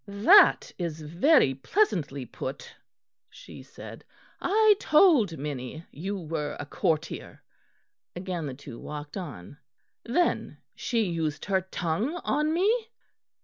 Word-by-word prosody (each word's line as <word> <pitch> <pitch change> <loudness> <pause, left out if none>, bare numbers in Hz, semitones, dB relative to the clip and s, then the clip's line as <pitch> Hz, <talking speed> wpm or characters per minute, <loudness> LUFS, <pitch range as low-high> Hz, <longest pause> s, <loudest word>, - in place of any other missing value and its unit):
"That 210 - +5
is 165 -3 -3
very 170 - +3
pleasantly 140 - 0
put," 130 +3 -7 0.5
she - - -12
said; - - -11 0.4
"I 435 +1 +5
told 300 - +4
Minnie 140 +2 -6
you 195 +7 -4
were 155 -4 -4
a 145 - -5
courtier." 155 +2 -3 0.7
Again 175 -3 -4
the 130 - -6
two 130 -3 -11
walked 150 0 -8
on. 145 - -8 0.4
"Then 340 +9 0 0.2
she 230 -3 0
used 165 -5 -2
her 190 -2 +1
tongue 190 - -2
on 300 +2 +1
me?" 430 +7 +1
175 Hz, 115 wpm, -27 LUFS, -, 0.7 s, That